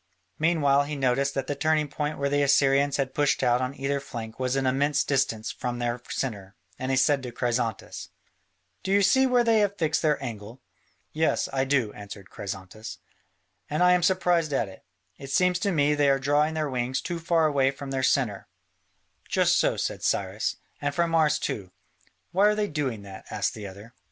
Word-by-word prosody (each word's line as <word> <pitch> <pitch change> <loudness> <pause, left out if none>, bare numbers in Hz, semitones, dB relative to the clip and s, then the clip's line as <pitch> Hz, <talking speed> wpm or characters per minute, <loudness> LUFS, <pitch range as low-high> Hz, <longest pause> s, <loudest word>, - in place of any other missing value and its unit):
Meanwhile 145 -4 +3
he 150 +1 -4
noticed 135 +1 0
that 135 -1 -1
the 145 - -2
turning 155 0 +1
point 150 +1 -3
where 140 - 0
the 145 +1 +1
Assyrians 140 0 +3
had 135 -2 -2
pushed 145 -2 +1
out 125 0 +3
on 130 +2 -3
either 140 +1 -1
flank 115 -4 -8
was 130 0 0
an 135 -1 0
immense 140 +3 +2
distance 125 -6 0
from 120 -1 -4
their 120 0 -2
centre, 100 -6 -4 0.2
and 130 - -3
he 130 - +1
said 135 +1 +3
to 125 -2 -6
Chrysantas: 120 -3 -3 0.7
"Do 190 - -3
you 200 0 +4
see 265 +6 +4
where 250 -1 +3
they 225 -2 +3
have 205 -1 +1
fixed 160 -3 0
their 150 -2 +2
angle?" 115 -2 -7 0.5
"Yes, 160 +1 +1
I 135 0 +1
do," 130 -6 +1
answered 100 -1 -10
Chrysantas, 95 +2 -7 0.7
"and 155 +4 +1
I 180 - +6
am 180 - +3
surprised 175 -4 +2
at 115 - +1
it: 95 - -13 0.4
it 135 - -9
seems 180 +5 +2
to 200 +2 0
me 150 -3 +2
they 145 -1 +3
are 135 - +4
drawing 145 +3 +1
their 155 -1 -1
wings 130 -1 -1
too 175 -2 -4
far 165 -1 +2
away 140 -3 +3
from 135 0 -7
their 135 -1 -1
centre." 125 -6 0 0.8
"Just - - +3
so," - - +1
said - - -3
Cyrus, - - -1 0.3
"and 145 0 -2
from 170 -1 +1
ours 155 -2 +3
too." 95 -9 -4 0.6
"Why 195 +4 +4
are 210 - +3
they 210 -1 0
doing 135 - -3
that?" 95 -1 -11
asked 105 -1 -1
the 105 -2 -7
other. 100 +5 -12
140 Hz, 195 wpm, -26 LUFS, 125-155 Hz, 0.8 s, I